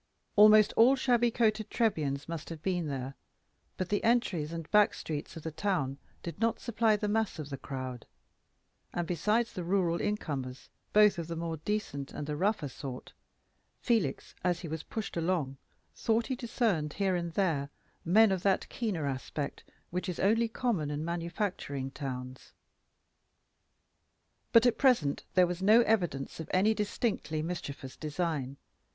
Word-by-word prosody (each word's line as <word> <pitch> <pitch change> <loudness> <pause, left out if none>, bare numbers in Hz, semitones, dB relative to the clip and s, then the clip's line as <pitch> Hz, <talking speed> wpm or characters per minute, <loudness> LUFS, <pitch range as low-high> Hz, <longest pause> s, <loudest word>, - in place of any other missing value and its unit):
Almost 215 +1 +7
all 245 +4 +6
shabby 240 -2 +3
coated 220 -2 +1
Trebians 150 -11 0
must 165 -1 -5
have 165 -2 -8
been 180 -4 0
there, 135 -1 -4 0.6
but 185 - -3
the 205 - 0
entries 190 -10 +1
and 165 -2 -5
back 210 -1 +5
streets 150 +1 -5
of 160 - -9
the 160 - -4
town 155 -5 -1 0.2
did 170 +2 -6
not 230 0 +1
supply 225 -2 +2
the 210 0 -2
mass 220 -1 0
of 150 -2 -6
the 135 - -3
crowd; 130 -3 -6 0.9
and 175 - -1
besides 210 +8 +1
the 180 - -4
rural 175 -1 +1
incomers, 140 -11 -3 0.2
both 210 -3 +5
of 165 - -4
the 170 - -4
more 165 0 -3
decent 155 -6 -3
and 150 - -4
the 150 0 -3
rougher 190 -2 0
sort, 130 -1 -8 0.7
Felix, 220 - 0
as 175 -1 +1
he 175 - -6
was 160 0 -4
pushed 220 +4 -5
along, 165 -6 -1 0.4
thought 225 0 +1
he 260 - -2
discerned 225 - 0
here 195 -2 +1
and 170 -1 -3
there 160 -8 +1 0.3
men 210 +5 +5
of 190 -2 0
that 195 0 +1
keener 200 -11 -2
aspect 140 +1 -4 0.3
which 180 +2 -2
is 180 - -4
only 225 +4 +3
common 225 -10 -1
in 150 +1 -3
manufacturing 170 -5 -3
towns. 130 -2 -6 2.0
But 230 0 +7
at 245 -2 +3
present 205 - +3
there 185 -1 +6
was 175 +1 -4
no 215 +5 +7
evidence 175 -14 0
of 160 - -6
any 200 +4 +4
distinctly 205 -7 -1
mischievous 145 -6 -5
design. 150 -4 -3
175 Hz, 160 wpm, -31 LUFS, 150-215 Hz, 2.0 s, Almost